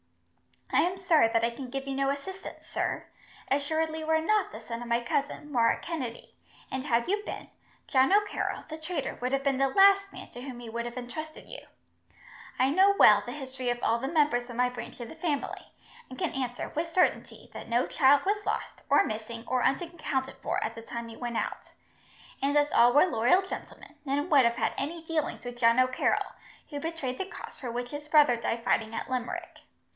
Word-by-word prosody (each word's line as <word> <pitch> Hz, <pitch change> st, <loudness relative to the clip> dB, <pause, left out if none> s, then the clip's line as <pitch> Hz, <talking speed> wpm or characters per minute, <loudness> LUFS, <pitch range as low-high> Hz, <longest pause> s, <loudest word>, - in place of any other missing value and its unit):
"I -, -, +5 dB
am 365 Hz, +2 st, -1 dB
sorry 340 Hz, -9 st, +4 dB
that 230 Hz, 0 st, +1 dB
I 230 Hz, -, +2 dB
can 255 Hz, +2 st, -8 dB
give 270 Hz, +1 st, -4 dB
you 275 Hz, -, -3 dB
no 275 Hz, 0 st, +1 dB
assistance, 375 Hz, +8 st, -6 dB
sir. -, -, -2 dB, 0.5 s
Assuredly 315 Hz, +3 st, 0 dB
you 315 Hz, 0 st, -5 dB
are 320 Hz, 0 st, +3 dB
not 425 Hz, +4 st, +1 dB
the 215 Hz, -, -9 dB
son 230 Hz, +1 st, -6 dB
of 240 Hz, -, -6 dB
my 235 Hz, 0 st, +1 dB
cousin, 285 Hz, +4 st, -2 dB
Murroch 230 Hz, -3 st, +2 dB
Kennedy; 265 Hz, -9 st, -5 dB, 0.4 s
and 265 Hz, +1 st, -3 dB
had 235 Hz, -3 st, +2 dB
you 410 Hz, +2 st, +1 dB
been, -, -, -7 dB, 0.4 s
John 265 Hz, +4 st, +4 dB
O'Carroll, 415 Hz, 0 st, +1 dB
the 315 Hz, 0 st, -7 dB
traitor, 315 Hz, -2 st, -3 dB
would 250 Hz, +1 st, -1 dB
have 275 Hz, 0 st, +1 dB
been 275 Hz, -2 st, +1 dB
the 275 Hz, -, +4 dB
last 395 Hz, +6 st, +5 dB
man -, -, -10 dB
to 245 Hz, -, -9 dB
whom 255 Hz, -2 st, -7 dB
he 235 Hz, -2 st, -8 dB
would 235 Hz, +1 st, -3 dB
have 240 Hz, +1 st, -6 dB
entrusted 310 Hz, +6 st, -7 dB
you. -, -, -8 dB, 1.0 s
I 260 Hz, +1 st, +3 dB
know 385 Hz, +5 st, +5 dB
well 210 Hz, -1 st, +8 dB
the 245 Hz, -, -6 dB
history 260 Hz, -3 st, -4 dB
of 240 Hz, 0 st, -2 dB
all 230 Hz, +1 st, +2 dB
the 265 Hz, -, -3 dB
members 290 Hz, -6 st, +2 dB
of 240 Hz, -, -7 dB
my 250 Hz, +1 st, +2 dB
branch 250 Hz, +1 st, -8 dB
of 235 Hz, -, -6 dB
the -, -, -10 dB
family, 305 Hz, -6 st, -3 dB, 0.4 s
and 255 Hz, -, -9 dB
can -, -, -1 dB
answer, 250 Hz, -2 st, -3 dB
with 325 Hz, +3 st, -2 dB
certainty, 360 Hz, +2 st, 0 dB
that -, -, -8 dB
no 240 Hz, +2 st, +2 dB
child 285 Hz, +1 st, +4 dB
was 410 Hz, +1 st, 0 dB
lost, -, -, -3 dB
or -, -, +6 dB
missing, 225 Hz, +1 st, -5 dB
or 255 Hz, 0 st, 0 dB
unaccounted 275 Hz, -3 st, -1 dB
for -, -, -2 dB
at 220 Hz, -, -3 dB
the 230 Hz, -, -9 dB
time 235 Hz, 0 st, -6 dB
he 225 Hz, -, -10 dB
went 240 Hz, -2 st, -3 dB
out; -, -, -4 dB, 0.7 s
and 285 Hz, +2 st, +2 dB
as 290 Hz, 0 st, +3 dB
all 240 Hz, +1 st, +5 dB
were 290 Hz, -, +7 dB
loyal 265 Hz, +4 st, +3 dB
gentlemen, 380 Hz, -, -8 dB
none 290 Hz, +4 st, -1 dB
would 275 Hz, -5 st, +6 dB
have 235 Hz, 0 st, +2 dB
had -, -, 0 dB
any 325 Hz, +3 st, -4 dB
dealings 320 Hz, -5 st, -2 dB
with 245 Hz, 0 st, -7 dB
John 230 Hz, 0 st, +5 dB
O'Carroll, 255 Hz, 0 st, +1 dB, 0.4 s
who 290 Hz, -3 st, -5 dB
betrayed 290 Hz, -5 st, -4 dB
the 385 Hz, -, -1 dB
cause -, -, -10 dB
for 255 Hz, -, -5 dB
which 245 Hz, +1 st, -4 dB
his 295 Hz, 0 st, -7 dB
brother 295 Hz, -5 st, +6 dB
died 230 Hz, 0 st, -2 dB
fighting 225 Hz, -2 st, +1 dB
at -, -, -4 dB
Limerick. 250 Hz, -2 st, -4 dB
270 Hz, 210 wpm, -29 LUFS, 240-315 Hz, 1.0 s, well